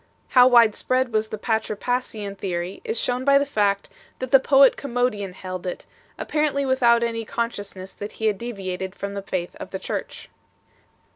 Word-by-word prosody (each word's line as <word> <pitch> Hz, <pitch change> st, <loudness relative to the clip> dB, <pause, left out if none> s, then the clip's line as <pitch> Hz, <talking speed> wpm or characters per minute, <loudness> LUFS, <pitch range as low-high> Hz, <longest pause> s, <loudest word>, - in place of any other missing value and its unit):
How 250 Hz, -1 st, +7 dB
widespread 245 Hz, +1 st, +3 dB
was 215 Hz, 0 st, +1 dB
the 215 Hz, -, -5 dB
Patripassian_ih_epry 205 Hz, -5 st, -3 dB
is 230 Hz, -, -1 dB
shown 250 Hz, +1 st, -1 dB
by 280 Hz, +1 st, +5 dB
the 280 Hz, -, +2 dB
fact, 205 Hz, -7 st, 0 dB, 0.3 s
that 255 Hz, -1 st, -5 dB
the 270 Hz, -, +8 dB
poet 270 Hz, 0 st, +5 dB
Commodian 245 Hz, -7 st, -2 dB
held 185 Hz, 0 st, -6 dB
it, 180 Hz, -, -5 dB, 0.3 s
apparently 300 Hz, -2 st, 0 dB
without 240 Hz, -3 st, +4 dB
any 230 Hz, -1 st, -2 dB
consciousness 205 Hz, -5 st, -5 dB
that 205 Hz, +1 st, -7 dB
he 220 Hz, -, -4 dB
had 210 Hz, -3 st, +1 dB
deviated 190 Hz, -5 st, -5 dB
from 200 Hz, 0 st, -5 dB
the 200 Hz, -, -4 dB
faith 185 Hz, -2 st, -4 dB
of -, -, -8 dB
the -, -, -4 dB
Church. -, -, -5 dB
220 Hz, 160 wpm, -23 LUFS, 200-250 Hz, 0.3 s, the